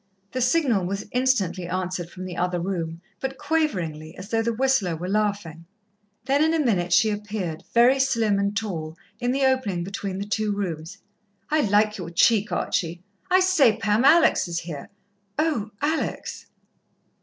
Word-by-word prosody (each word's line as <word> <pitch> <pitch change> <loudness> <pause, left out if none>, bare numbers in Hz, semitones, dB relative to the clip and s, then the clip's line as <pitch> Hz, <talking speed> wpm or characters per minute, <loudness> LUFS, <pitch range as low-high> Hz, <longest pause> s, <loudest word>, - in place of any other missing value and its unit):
The 255 - -2
signal 255 - +2
was 200 +2 -3
instantly 215 -9 +1
answered 180 -1 -3
from 185 +1 -8
the 180 -2 -6
other 180 0 -1
room, 170 -2 -3 0.2
but 265 +2 -4
quaveringly, 175 - -2
as 185 +3 -9
though 225 0 +1
the 235 +1 0
whistler 230 -7 +1
were 175 +3 -5
laughing. 200 -5 -2 0.6
Then 280 +3 +3
in 320 +1 +2
a 300 - +1
minute 180 -7 +1
she 180 +5 +4
appeared, 205 -6 -4
very 245 +3 +5
slim 230 -6 +2
and 200 +1 0
tall, 165 -7 -4 0.2
in 245 0 0
the 270 +1 +1
opening 230 -10 +1
between 195 0 -4
the 200 - -3
two 210 0 -1
rooms. 180 -2 -4 0.5
"I 310 - +3
like 210 -2 +2
your 170 -2 -5
cheek, 205 +5 +3
Archie!" 175 +1 -2 0.3
"I 370 +1 +5
say, 350 - +4
Pam, 210 +3 +1
Alex 320 - +5
is 170 -1 -3
here." 160 -4 -7 0.5
"Oh, 300 -9 0
Alex!" 310 +2 -2
205 Hz, 165 wpm, -24 LUFS, 175-255 Hz, 0.6 s, very